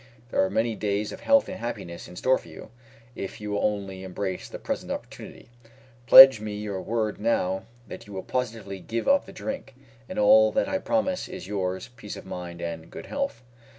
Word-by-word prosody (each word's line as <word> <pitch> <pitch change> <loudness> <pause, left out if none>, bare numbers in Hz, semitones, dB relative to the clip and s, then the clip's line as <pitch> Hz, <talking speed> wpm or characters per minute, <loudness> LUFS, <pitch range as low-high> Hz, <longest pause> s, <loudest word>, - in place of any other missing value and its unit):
There - - +3
are 95 - 0
many 115 +4 0
days 105 0 -1
of - - -8
health 280 0 +4
and 185 - -6
happiness 85 -8 -6
in 90 - -12
store 130 +8 +2
for - - -16
you, 80 +6 -12 0.4
if 95 - -6
you 105 -1 -5
will 100 - -1
only 100 -3 -2
embrace 95 0 -4
the - - -7
present - - -4
opportunity. - - -8 0.6
Pledge 130 -2 +11
me 105 -1 -4
your 105 -2 -4
word 110 -1 -2
now 95 -4 0 0.2
that 115 - -9
you 100 - -10
will 95 - -5
positively 115 -6 -3
give 115 +5 -4
up 280 0 +3
the - - -9
drink, 270 - -6 0.3
and - - -6
all 270 +1 +6
that 270 - +1
I 285 - -1
promise 280 -1 -1
is 185 0 -8
yours 95 +2 -3
peace 105 - -8
of - - -10
mind 85 -2 -7
and 85 -1 -5
good - - -9
health." 280 - -3
105 Hz, 200 wpm, -26 LUFS, 95-130 Hz, 0.6 s, Pledge